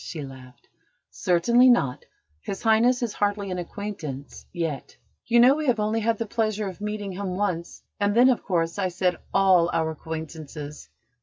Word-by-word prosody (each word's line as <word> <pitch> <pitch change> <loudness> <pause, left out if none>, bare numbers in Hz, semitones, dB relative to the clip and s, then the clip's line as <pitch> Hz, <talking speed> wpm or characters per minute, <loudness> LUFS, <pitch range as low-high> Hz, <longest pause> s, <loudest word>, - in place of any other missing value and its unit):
she 155 -4 -6
laughed. 130 -1 -14 0.4
"Certainly 235 +9 +4
not. 140 - +2 0.4
His 195 - -6
Highness 240 +3 +3
is 230 - -2
hardly 205 -1 -1
an 180 - -3
acquaintance 170 -7 -7
yet. 165 -6 -4 0.3
You 235 0 +4
know 250 +3 +7
we 305 0 -3
have 240 -3 +2
only 215 +2 0
had 225 0 0
the 230 - -2
pleasure 215 -1 -1
of 190 +1 -8
meeting 210 -1 -4
him 185 -1 -4
once: 180 -4 -3 0.2
and 205 0 +1
then, 245 +2 +6
of 250 - +2
course, 170 -1 -1
I 190 - +1
said 180 0 -1
all 185 -3 +4
our 160 -1 0
acquaintances. 155 -2 -7
195 Hz, 170 wpm, -25 LUFS, 165-220 Hz, 0.4 s, know